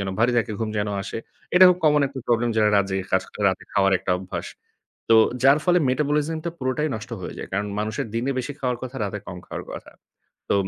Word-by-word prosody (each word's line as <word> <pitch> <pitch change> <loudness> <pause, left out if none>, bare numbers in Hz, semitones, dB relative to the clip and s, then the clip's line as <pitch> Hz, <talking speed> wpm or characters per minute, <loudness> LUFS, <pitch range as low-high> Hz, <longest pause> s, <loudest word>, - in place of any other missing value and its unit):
যেন 100 - -2
ভারী 120 +2 +3
থাকে 115 -1 -1
ঘুম 110 - -2
যেন 105 0 -1
আসে। - - -5 0.4
এটা 185 +1 +9
খুব 180 -1 +3
কমন 150 -1 +5
একটা 135 0 -8
প্রবলেম 120 0 +2
যারা 105 -1 +4
রাত 100 -1 +3 0.3
কাজ 95 0 +3
করে - - -7
রাতে 95 - -3
খাওয়ার 95 -1 +3
একটা 90 - -4
অভ্যাস। 95 0 -6 0.6
তো 115 - +7 0.3
যার 135 +3 +6
ফলে 180 -1 +4
মেটাবলিজমটা 150 +4 0
পুরোটাই 130 +4 -1
নষ্ট 110 +2 -9
হয়ে 90 - -6
যায়। - - -6
কারণ 100 +2 -1
মানুষের 110 +1 -2
দিনে 120 +4 0
বেশি 130 +3 -3
খাওয়ার 125 -2 -1
কথা, 130 +1 -6
রাতে 105 +1 -4
কম 90 - -7
খাওয়ার - - -6
কথা। - - -9 0.6
তো - - +2
120 Hz, 215 wpm, -23 LUFS, 105-145 Hz, 0.6 s, এটা